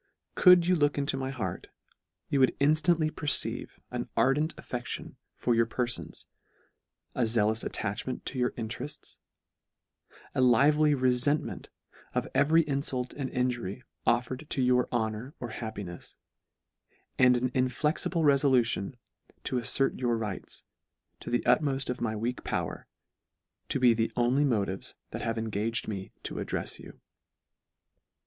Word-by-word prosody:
Could 180 -2 +7
you 180 +1 +3
look 145 -3 +2
into 140 -1 0
my 135 0 -3
heart, 110 -10 -4 0.6
you 140 - +1
would 130 - +3
inftantly 155 +2 +3
perceive 150 -2 0
an - - -4
ardent 150 +5 +2
affec 125 -1 -5
tion - - -6 0.2
for 120 - +1
your 115 0 +3
perfons, 120 0 -3 0.9
a 120 -3 +1
zealous 110 0 +2
attachment 105 +6 -4
to 130 - -3
your 125 - +2
interefts, 125 +5 -6 1.1
a - - +1
lively 145 +5 +5
refentment 130 +3 +1 0.5
of - - +1
e - - -10
very 160 +4 +4
infult 135 -3 -1
and 135 -2 -4
injury 125 -3 -2 0.2
offered 125 +5 0
to 135 - 0
your 125 0 +3
honour 115 +3 -2
or 120 - -5
happinefs, 105 -7 -7 1.0
and 125 -1 +6
an 125 +1 -1
inflexible 150 +6 0
refolution 130 -6 +3 0.5
to 125 - -1
affert 125 +3 +2
your 120 -2 +1
rights, 105 -4 -5 0.6
to - - -8
the 120 - +1
utmoft 135 +1 +2
of 125 - -6
my 110 -2 -1
weak 120 +3 -3
power, - - -3 0.8
to - - 0
be 125 -2 +6
the 115 0 0
only 125 +4 +3
motives 100 -7 -1 0.2
that - - -5
have 115 0 -2
engaged 110 +1 -1
me 95 -3 -5
to - - -4
addrefs - - -3
you. - - -12
125 Hz, 140 wpm, -29 LUFS, 115-140 Hz, 1.1 s, Could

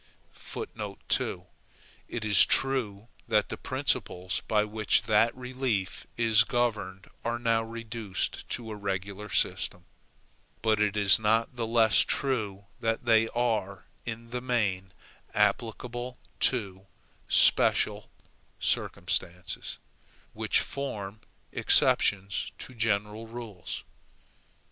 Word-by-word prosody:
2. - - -3 0.6
It 115 -2 -4
is 105 -2 +7
true 115 -6 0 0.2
that - - +2
the - - -3
principles 90 0 -1
by 105 -1 +3
which 105 -1 +1
that 115 +1 +3
relief 125 -6 -2
is 110 -2 +5
governed 105 -5 -1 0.2
are 120 0 -1
now 115 -1 +2
reduced 115 -3 -4
to 115 -2 -3
a - - -4
regular 100 +1 -4
system; 90 -2 0 0.8
but 110 -2 +3
it 105 0 +1
is 100 -1 +5
not 110 +3 +1
the 115 -2 -2
less 115 -2 +4
true 105 -8 0
that 115 +1 -1
they 115 -1 +5
are 110 -5 -1 0.2
in 115 0 -6
the 125 0 -3
main 100 -7 0 0.4
applicable 120 +2 -1 0.2
to 100 -6 +1 0.4
SPECIAL - - +3 0.5
circumstances, 90 +1 -2 0.6
which - - +2
form 110 -7 -5 0.3
exceptions 100 -1 +3
to - - -8
general 110 -1 -1
rules. 110 -6 -7
110 Hz, 105 wpm, -29 LUFS, 100-120 Hz, 0.8 s, is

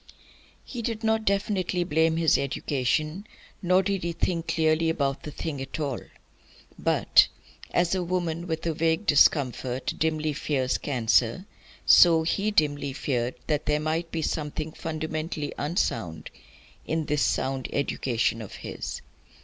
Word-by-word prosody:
He 245 - -6
did 225 0 -3
not 220 0 +1
definitely 195 -3 0
blame 160 0 +2
his 165 -2 +4
education; 150 - -1 0.3
he 180 - -6 0.2
did 195 -2 -1
not 170 -1 -3
think 170 -2 -1
clearly 160 0 +2
about 140 -4 -1
the - - -7
thing 150 -1 -5
at 135 +3 -6
all. 140 -5 -2 0.8
But, - - +4 0.4
as 175 0 +2
a 185 - +1
woman 175 -1 -2
with 160 -1 -3
a 165 - 0
vague 160 +5 0
discomfort 130 -4 +2
dimly 155 -1 0
fears 135 -3 -1
cancer, 120 - +1 0.4
so 165 -2 +7
he 200 +6 0
dimly 145 -7 +1
feared 125 -3 -1
that 150 -1 -1
there 150 0 +2
might 160 +2 -1
be 160 -1 -2
something 155 0 -3
fundamentally 155 -1 -4
unsound 115 - -2 0.6
in 160 0 -1
this 150 -1 0
sound 135 -1 0
education 120 -4 0
of 105 - -8
his. - - -6
155 Hz, 140 wpm, -26 LUFS, 140-170 Hz, 0.8 s, so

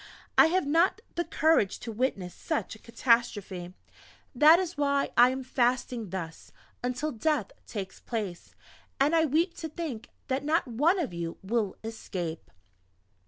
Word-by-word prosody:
I - - +8
have 365 +1 +1
not 330 +8 +3
the 345 - -1
courage 315 - +2
to 230 - -5
witness 210 -6 -2
such 315 -3 -3
a 220 - -12
catastrophe. 210 -7 0 0.6
That 305 +6 +7
is 360 -1 -2
why 280 -1 +1
I 245 +1 +7
am 260 +1 -3
fasting 245 -3 0
thus, 170 -3 -6 0.3
until 250 +5 -1
death 270 -3 0 0.2
takes 195 -4 -6
place; 205 -7 -5 0.4
and 290 +4 +3
I 325 -1 +4
weep 325 +5 +1
to 320 - -5
think 295 -8 -6 0.2
that 265 0 -1
not 310 +1 +1
one 295 - +2
of 305 - -2
you 170 -1 -4
will 210 -1 -1
escape!" 180 -7 -5
250 Hz, 150 wpm, -28 LUFS, 210-310 Hz, 0.6 s, I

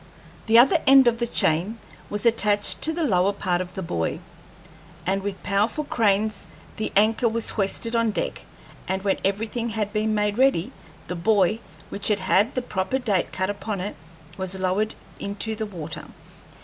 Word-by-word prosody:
The 225 +1 +6
other 275 +8 +6
end 270 -1 +8
of 230 -1 +2
the 235 - 0
chain 185 +2 +1 0.3
was 205 +2 -2
attached 210 -3 +2
to 320 - +3
the 335 +1 -2
lower 195 -7 +3
part 180 -3 -1
of 180 0 -7
the 190 - -4
buoy, 85 - -2 0.9
and 195 +1 0
with 195 -1 -5
powerful 210 +9 0
cranes 215 -5 0 0.3
the 215 - -2
anchor 220 +3 +3
was 230 0 -2
hoisted 225 +3 -1
on 230 -1 +2
deck, 210 - -3 0.5
and 190 0 -2
when 195 -1 +1
everything 225 +4 -1
had 210 -1 -3
been 215 0 0
made 210 +1 0
ready 260 -5 +3 0.3
the 180 - -5
buoy, 205 +3 +2 0.3
which 200 - -4
had 205 -2 +1
had 195 +5 +2
the 255 - -1
proper 190 +3 -1
date 210 -8 0
cut 185 +1 -1
upon 205 0 -4
it, 190 -1 -4 0.4
was 190 0 -3
lowered 190 +4 0 0.2
into 205 +2 -3
the 220 0 -4
water. 165 -6 -7
210 Hz, 175 wpm, -24 LUFS, 190-230 Hz, 0.9 s, end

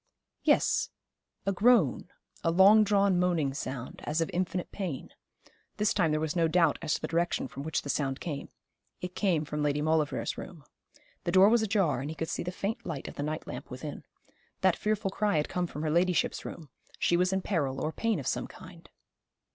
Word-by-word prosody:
Yes, - - +3 0.6
a 195 - +2
groan, 195 - +3 0.3
a 165 - +2
long 195 +5 +7
drawn 200 -3 +3
moaning 170 -6 +1
sound, 130 -2 -6
as 150 +2 -1
of 165 - 0
infinite 180 0 -2
pain. 180 -10 -5 0.7
This 210 0 +2
time 180 -5 +2
there 155 0 +1
was 155 +1 -2
no 165 -2 +3
doubt 165 -2 +3
as 150 - 0
to - - -5
the - - -2
direction 170 -3 0
from 135 - -8
which 155 +1 -2
the 140 - -7
sound 135 -2 -1
came. 150 -5 -5 0.5
It 180 0 -5
came 175 -7 +1
from 150 0 -3
Lady 145 0 +1
Maulevrier's 150 -5 0
room. 165 -6 -9 0.6
The 175 - 0
door 190 +3 +7
was 235 0 +4
ajar, 195 - +1
and 140 - -4
he 160 - -5
could 160 +1 -3
see - - -2
the 180 - -3
faint 200 +4 -3
light 155 -6 -5
of - - -7
the - - -5
night 155 +2 -3
lamp - - -7
within. - - -7 0.6
That - - +4
fearful 210 -2 -1
cry 205 -3 +1
had 150 - 0
come 180 -1 -1
from 150 -1 -6
her 155 - 0
ladyship's 175 +2 +1
room. 160 -4 -8 0.3
She 175 - +2
was 180 +2 +2
in 190 -1 0
peril 140 -8 -1
or 155 - -1
pain 225 -6 0
of 135 - -6
some - - -1
kind. - - -13
170 Hz, 205 wpm, -29 LUFS, 150-190 Hz, 0.7 s, long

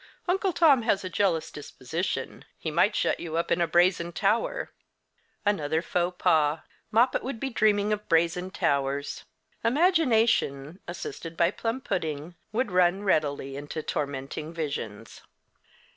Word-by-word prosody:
Uncle 380 +2 +1
Tom 305 -7 +5
has 210 -4 +1
a 185 - -5
jealous 170 -4 +1
disposition. 150 +4 -4
He - - -4
might - - +3
shut - - +1
you 165 -1 -4
up 170 - -1
in 175 - +2
a 170 - +2
brazen 175 +1 +3
tower." 220 - 0 0.7
Another 160 -5 +1
faux 180 0 -1
pas. 155 -3 +2 0.3
Moppet 240 +4 +3
would 255 -3 -5
be 270 +2 -3
dreaming 210 -2 +2
of 210 0 -5
brazen 170 +2 +2
towers. 140 -5 -1 0.4
Imagination, 230 - +2
assisted 165 -1 -7
by 170 - +3
plum 230 +3 -3
pudding, 160 - -3 0.2
would 235 0 -1
run 180 +2 +3
readily 145 -7 0
into 145 +2 -5
tormenting 140 +2 -4
visions. 115 -10 -5
175 Hz, 135 wpm, -27 LUFS, 155-215 Hz, 0.7 s, Tom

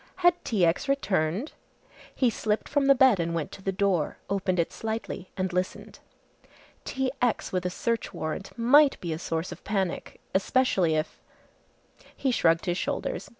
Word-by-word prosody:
Had 350 0 +4
T. 200 -6 +2
X. 170 - 0
returned! 200 - 0 0.6
He 250 -3 +3
slipped 215 0 -1
from 285 -2 +1
the 275 - +7
bed 255 -6 +5
and 170 0 -1
went 160 -3 -3
to - - -10
the 195 - -1
door, 190 -5 0
opened 190 -2 0
it 170 - 0
slightly 220 -4 -4
and 185 -1 -1
listened. 180 +1 -3 0.9
T. 265 -1 -1
X. 245 -3 0
with 180 -1 -1
a - - -1
search 230 +5 -2
warrant 170 +2 -4
might 275 +5 +5
be 170 -2 -3
a 155 - -5
source 165 0 -3
of - - -10
panic 195 -4 -2
especially 190 -5 +2
if 155 +1 -3 1.0
he 265 - +1
shrugged 165 -6 +3
his 175 -1 0
shoulders. - - -3
195 Hz, 165 wpm, -27 LUFS, 175-245 Hz, 1.0 s, the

